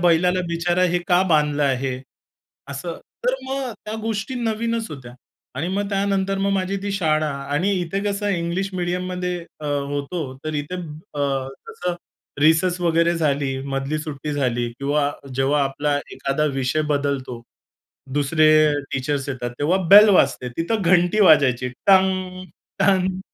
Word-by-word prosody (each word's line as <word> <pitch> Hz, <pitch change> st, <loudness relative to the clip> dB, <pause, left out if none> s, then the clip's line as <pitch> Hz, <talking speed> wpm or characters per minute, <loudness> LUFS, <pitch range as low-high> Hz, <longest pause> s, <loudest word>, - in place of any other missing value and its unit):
बैलाला 180 Hz, +1 st, +3 dB
बिचारा 175 Hz, +2 st, 0 dB
हे 175 Hz, -, +2 dB
का 180 Hz, +1 st, +4 dB
बांधलं 150 Hz, -2 st, +2 dB
आहे? 135 Hz, -1 st, 0 dB, 0.8 s
असं 165 Hz, +5 st, -5 dB, 0.3 s
तर -, -, +2 dB
मग 265 Hz, -2 st, -3 dB
त्या 215 Hz, +1 st, -5 dB
गोष्टी 225 Hz, +3 st, -3 dB
नवीनच 225 Hz, -2 st, -1 dB
होत्या. 125 Hz, -5 st, -9 dB, 0.4 s
आणि 160 Hz, +7 st, -2 dB
मग 200 Hz, +1 st, -1 dB
त्यानंतर 195 Hz, 0 st, 0 dB
मग 200 Hz, 0 st, +1 dB
माझी 195 Hz, 0 st, -1 dB
ती 200 Hz, -1 st, -2 dB
शाळा 155 Hz, -5 st, +1 dB, 0.2 s
आणि 185 Hz, +7 st, +1 dB
इथे 185 Hz, +3 st, -2 dB
कसं 205 Hz, 0 st, -1 dB
इंग्लिश 180 Hz, +1 st, -1 dB
मीडियममध्ये 180 Hz, 0 st, -2 dB, 0.2 s
अ, -, -, -8 dB
होतो, 145 Hz, +3 st, -2 dB, 0.2 s
तर 155 Hz, 0 st, -3 dB
इथे 145 Hz, +5 st, -3 dB, 0.4 s
अ, 135 Hz, -2 st, -1 dB, 0.2 s
तसं 180 Hz, 0 st, -3 dB, 0.5 s
रिसेस 175 Hz, +4 st, +3 dB
वगैरे 170 Hz, 0 st, +2 dB
झाली, 140 Hz, -4 st, 0 dB
मधली 135 Hz, +2 st, -2 dB
सुट्टी 150 Hz, -1 st, -5 dB
झाली 120 Hz, -4 st, 0 dB
किंवा 145 Hz, +1 st, +1 dB, 0.2 s
जेव्हा 140 Hz, +2 st, +2 dB
आपला 145 Hz, +2 st, -1 dB, 0.2 s
एखादा 135 Hz, +3 st, -1 dB
विषय 135 Hz, +4 st, 0 dB
बदलतो, 140 Hz, -4 st, -2 dB, 0.7 s
दुसरे 155 Hz, +2 st, +3 dB, 0.2 s
अ, 150 Hz, -, +2 dB, 0.2 s
टीचर्स 135 Hz, +1 st, -2 dB
येतात, 125 Hz, -3 st, -3 dB
तेव्हा 165 Hz, +6 st, +2 dB
बेल 210 Hz, +2 st, +10 dB
वाजते. 155 Hz, -9 st, +3 dB
तिथं 200 Hz, +6 st, -1 dB
घंटी 180 Hz, +4 st, +3 dB
वाजायची 130 Hz, -8 st, +5 dB, 0.2 s
टंग, 185 Hz, -1 st, +3 dB, 0.3 s
टंग. 190 Hz, -1 st, +2 dB
165 Hz, 140 wpm, -22 LUFS, 145-190 Hz, 0.8 s, बेल